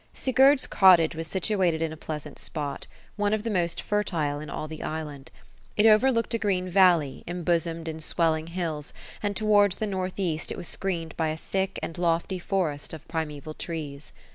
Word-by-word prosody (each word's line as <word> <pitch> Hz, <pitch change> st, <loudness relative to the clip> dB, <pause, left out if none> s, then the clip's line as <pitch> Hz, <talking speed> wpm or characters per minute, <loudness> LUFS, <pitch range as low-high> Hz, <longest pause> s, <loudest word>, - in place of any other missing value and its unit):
^Sigurd's 265 Hz, +1 st, +4 dB
cottage 175 Hz, -4 st, +5 dB
was 165 Hz, 0 st, -4 dB
situated 185 Hz, -2 st, +1 dB
in 160 Hz, -1 st, -1 dB
a -, -, -7 dB
pleasant 150 Hz, -2 st, -7 dB
spot; 145 Hz, -3 st, -4 dB, 0.3 s
one 205 Hz, 0 st, +2 dB
of 215 Hz, -, -5 dB
the 230 Hz, -, -2 dB
most 175 Hz, -3 st, -1 dB
fertile 165 Hz, -9 st, -1 dB
in 150 Hz, -, -7 dB
all 155 Hz, -, -4 dB
the 155 Hz, 0 st, -8 dB
island. 150 Hz, -3 st, -5 dB, 0.5 s
It 210 Hz, -, +4 dB
overlooked 230 Hz, +2 st, +4 dB
a 230 Hz, -, +1 dB
green 185 Hz, -3 st, 0 dB
valley, 175 Hz, -7 st, +4 dB
embosomed 170 Hz, -1 st, -1 dB
in 160 Hz, 0 st, -4 dB
swelling 160 Hz, 0 st, +1 dB
hills; 165 Hz, -4 st, -4 dB, 0.3 s
and 205 Hz, -1 st, -1 dB
towards 205 Hz, -2 st, +4 dB
the 220 Hz, -, -1 dB
north 185 Hz, -2 st, -3 dB
east 170 Hz, -5 st, -1 dB
it -, -, -4 dB
was 175 Hz, -, -5 dB
screened 170 Hz, -4 st, -3 dB
by 160 Hz, -, +1 dB
a 155 Hz, 0 st, -2 dB
thick 190 Hz, +3 st, -2 dB
and 165 Hz, -, -5 dB
lofty 170 Hz, +2 st, 0 dB
forest 175 Hz, -7 st, -2 dB
of 155 Hz, -2 st, -9 dB
primaeval 155 Hz, -2 st, -4 dB
trees. 150 Hz, -4 st, -6 dB
170 Hz, 180 wpm, -27 LUFS, 155-195 Hz, 0.5 s, cottage